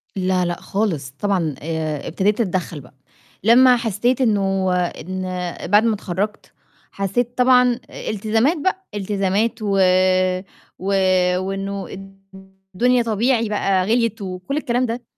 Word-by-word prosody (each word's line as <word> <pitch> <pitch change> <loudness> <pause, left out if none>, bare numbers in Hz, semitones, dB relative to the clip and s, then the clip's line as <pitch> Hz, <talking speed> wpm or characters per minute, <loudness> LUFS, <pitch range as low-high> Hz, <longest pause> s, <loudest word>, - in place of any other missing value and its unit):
لا، 185 -1 +1
لأ 175 0 -3
خالص، 175 -10 -2
طبعًا 180 -8 0
آآ 155 -2 -3
ابتديت 205 +6 0
أتدخّل 180 -6 -2
بقى، 125 - -18 0.5
لمّا 250 +3 +6
حسّيت 235 +3 0
إنه 195 -5 +1
إن 185 +1 -3 0.5
بعد 210 +2 +6
ما 230 -1 +2
اتخرّجت، 200 +2 -4 0.4
حسّيت 235 +6 -2
طبعًا 250 -1 +4
أ - - -7
التزامات 225 - +1
بقى، 375 +5 -2
التزامات 205 +3 -1
و 200 -2 0 1.0
و 185 - -8 0.5
وإنه 195 +1 -4
الد 195 0 -11 0.6
الدنيا 245 +4 +3
طبيعي 230 +1 +1
بقى 195 -3 +1
غِليِت 230 0 0
وكلّ 185 +8 -4
الكلام 250 -4 0
ده، 240 +1 -4
205 Hz, 125 wpm, -20 LUFS, 185-235 Hz, 1.0 s, لمّا